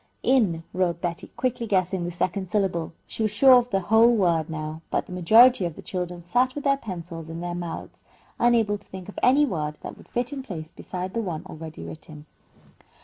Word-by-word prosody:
"Inn" 200 -11 +2
wrote 175 -2 0
Betty, 170 -1 -3
quickly 240 -2 -1
guessing 185 -2 +1
the - - -2
second 185 +2 -2
syllable. 190 -6 0
She - - -6
was 215 -1 +1
sure 260 +6 +7
of 245 0 -4
the 195 -3 0
whole 220 +5 +5
word, 170 -6 +2
now, 155 0 -5
but - - -1
the - - -13
majority 220 +6 +6
of 170 -3 -3
the - - -11
children 180 -2 -4
sat 250 +8 +1
with 290 - -5
their 275 -1 +3
pencils 170 - -7
in 165 0 -6
their 175 0 -4
mouths, 175 -1 -6 0.4
unable 225 -4 +3
to 200 - -16
think 190 0 -9
of - - -7
any 280 +4 +5
word 150 - -3
that - - -8
would - - -17
fit 245 +4 -2
in 275 - -4
place 165 -11 -7
beside 185 0 -6
the 230 - -1
one 175 -7 -4
already 160 0 -9
written. 155 -1 -10
185 Hz, 205 wpm, -25 LUFS, 170-230 Hz, 0.4 s, sure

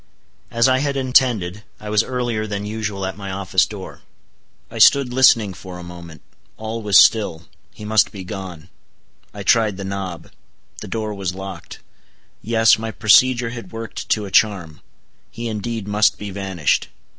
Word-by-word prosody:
As 115 0 +2
I 130 0 +3
had 140 0 -1
intended, 120 -7 +1 0.2
I 105 0 -7
was 105 0 +4
earlier 120 -3 -3
than 100 -1 -4
usual 105 -2 -4
at 95 0 -5
my 100 -1 -6
office 95 -2 +1
door. - - -10 0.7
I - - -7
stood 135 -3 +5
listening 115 -6 +4
for 90 +1 -10
a 90 - -9
moment. 85 -3 -11 0.3
All 110 +1 -5
was 105 -4 +4
still. 95 -5 +4 0.3
He 105 - -11
must 110 0 +3
be 95 -2 -8
gone. 90 -3 -8 0.6
I - - -8
tried 110 -4 +2
the 100 - -6
knob. 95 -3 -6 0.5
The - - -8
door 110 -2 -3
was 95 -3 -4
locked. 95 -2 -9 0.6
Yes, 115 0 +3
my 110 0 -4
procedure 120 +3 +3
had 115 -6 -9
worked 115 0 -7
to 105 -2 +1
a 95 - -9
charm; 95 -8 +1 0.5
he 120 0 -6
indeed 110 -1 -4
must 105 +1 +2
be 105 -1 -7
vanished. 95 -5 -1
105 Hz, 165 wpm, -20 LUFS, 95-115 Hz, 0.7 s, stood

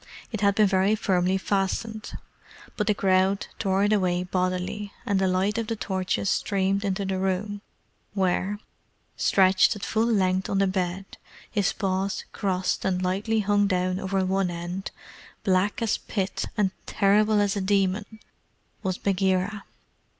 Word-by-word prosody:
It 220 -3 -4
had 200 -1 +3
been 215 - +5
very 195 +2 +3
firmly 185 -2 +1
fastened, 205 +3 -2 0.6
but - - -1
the 210 - +3
crowd 190 0 +2
tore 195 -1 +1
it 205 +1 +3
away 180 -3 +1
bodily, 185 +3 -2
and 200 -5 +1
the 190 - +2
light 190 +4 +1
of 225 - -3
the 225 - -1
torches 190 -2 -2
streamed 195 0 +1
into 195 0 -1
the 190 -1 -1
room 195 +2 -2 0.5
where, 190 +1 0 0.6
stretched 190 0 +4
at 200 - -6
full 220 +1 +1
length 190 -4 +1
on 195 - 0
the 195 - +3
bed, 185 0 -2 0.5
his 205 -3 +1
paws 195 0 -2
crossed 185 -2 -1
and 185 -1 0
lightly 205 +4 0
hung 205 0 +2
down 185 -1 0
over 190 0 0
one 190 0 +1
end, 175 +3 -5 0.5
black 195 +3 +1
as 220 - +1
the - - -24
Pit, 195 -2 -1
and 200 -3 +2 0.2
terrible 210 +1 +3
as 205 -1 +1
a 200 - -1
demon, 200 +2 0 0.6
was 190 -3 -2
Bagheera. 195 +1 0
195 Hz, 155 wpm, -26 LUFS, 185-205 Hz, 0.6 s, been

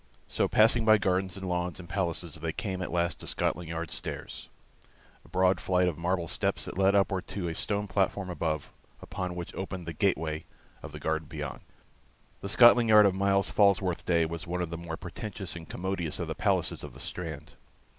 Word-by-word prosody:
So - - +1
passing 115 +2 +4
by 110 0 +6
gardens 95 -1 0
and 95 -1 -5
lawns 90 -1 -2
and 90 - -9
palaces, 85 -4 -2
they 80 0 -3
came 95 -1 -3
at 95 - -3
last 85 0 0
to - - -9
Scotland 85 -2 -1
Yard 85 -1 -4
stairs, - - -5 0.7
a - - -19
broad 95 0 +2
flight 90 -1 +2
of 85 -2 -2
marble 85 0 0
steps - - -1
that - - -7
led 95 +1 +4
upward 95 -2 +1
to 95 -4 -4
a 85 - -2
stone 100 +4 -1
platform 100 0 0
above, 80 -4 -2 0.3
upon 90 -1 -5
which 85 -1 -6
opened 95 -2 -5
the 85 - -5
gate 100 +5 +2
way 80 0 -4 0.4
of - - -8
the - - -8
garden 80 -1 -1
beyond. 75 -4 -6 0.8
The 100 - -5
Scotland 120 +1 +7
Yard 105 -1 +8
of 100 - +4
Myles 100 0 +2
Falworth's 100 -4 +3
day 85 -2 +2
was 85 +3 -5
one 90 +1 -1
of 85 - -5
the - - -3
more 85 -1 -5
pretentious 95 0 -6
and 80 -1 -9
commodious 90 -4 -3
of - - -3
the - - -2
palaces - - 0
of - - -9
the - - -11
Strand. 80 -5 -5
90 Hz, 205 wpm, -29 LUFS, 85-100 Hz, 0.8 s, Yard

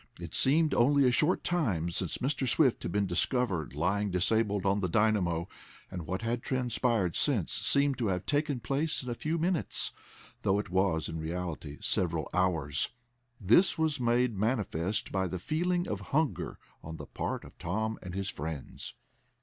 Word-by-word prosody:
It - - -8
seemed 155 +4 +3
only 140 +2 +4
a - - +4
short 155 +8 +2
time 105 - 0
since 90 +1 -1
Mr. 135 0 -1
Swift 135 -1 +3
had - - -3
been 100 +2 +1
discovered 90 - 0
lying 100 +7 0
disabled 100 +2 +1
on 100 +1 +2
the 90 -3 -1
dynamo, 95 -5 +1 0.4
and 85 -4 -6
what 95 +5 -3
had 120 +1 -1
transpired 120 -8 0
since - - +2
seemed 140 -1 +2
to 115 - 0
have 90 -2 -1
taken 145 -2 0
place 140 +6 0
in 125 - -4
a - - 0
few 155 +7 -2
minutes, 170 0 0 0.5
though 95 - +2
it 105 -3 -4
was, 95 -4 +1
in 80 0 -5
reality, 80 -3 -5
several 85 -5 0
hours. 80 -6 +1 0.5
This 115 - +4
was 160 -3 +1
made 120 -1 +2
manifest 100 -3 -1
by 95 -1 0
the 90 - -4
feeling 175 - -1
of - - -3
hunger 155 0 -1 0.3
on 80 0 -7
the - - -8
part - - -4
of - - -14
Tom 110 +6 -2
and 90 0 -7
his 100 0 -2
friends. 75 -1 -6
105 Hz, 170 wpm, -30 LUFS, 90-130 Hz, 0.5 s, only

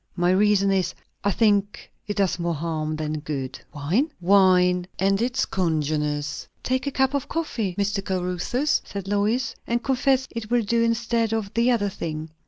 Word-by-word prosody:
"My 175 0 +2
reason 200 0 +3
is, 190 -2 0 0.3
I 200 - +2
think 205 -1 +1 0.2
it 205 - -3
does 185 -3 +1
more 170 -1 -1
harm 155 0 -2
than 155 0 -3
good." 135 -4 -5
"Wine?" 175 - 0
"Wine, 180 -1 +4
and 195 +2 +2
its 255 +2 +1
congeners." 150 -4 -1 0.2
"Take 260 +2 -1
a - - 0
cup 265 0 +1
of 280 -2 -2
coffee, 230 - -2
Mr. 200 0 0
Caruthers," 190 - 0
said 200 -1 -7
Lois; 220 +4 +1
"and 235 0 0
confess 265 0 +2
it 230 -2 -6
will 240 -1 +2
do 230 +3 +1
instead 230 -1 +1
of 210 -3 -3
the 235 +2 +3
other 215 -5 +2
thing." 160 -4 -5
200 Hz, 170 wpm, -24 LUFS, 175-230 Hz, 0.3 s, Wine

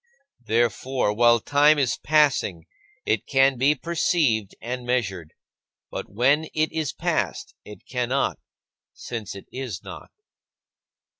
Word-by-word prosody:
Therefore, 120 +1 +1
while 120 +1 +5
time 145 +5 +4
is 130 -4 0
passing, 140 - +2 0.4
it 110 - 0
can 135 0 +4
be 140 +4 +4
perceived 150 - 0
and 125 +2 -5
measured; 100 -10 -2 0.6
but - - -6
when 135 +9 +2
it 155 0 +1
is 160 -3 -2
past, - - -2
it 105 -2 -12
cannot, 125 +2 -1 0.5
since 110 -5 -6
it 100 - -10
is 125 -8 -6
not. - - -10
125 Hz, 120 wpm, -24 LUFS, 110-145 Hz, 0.6 s, while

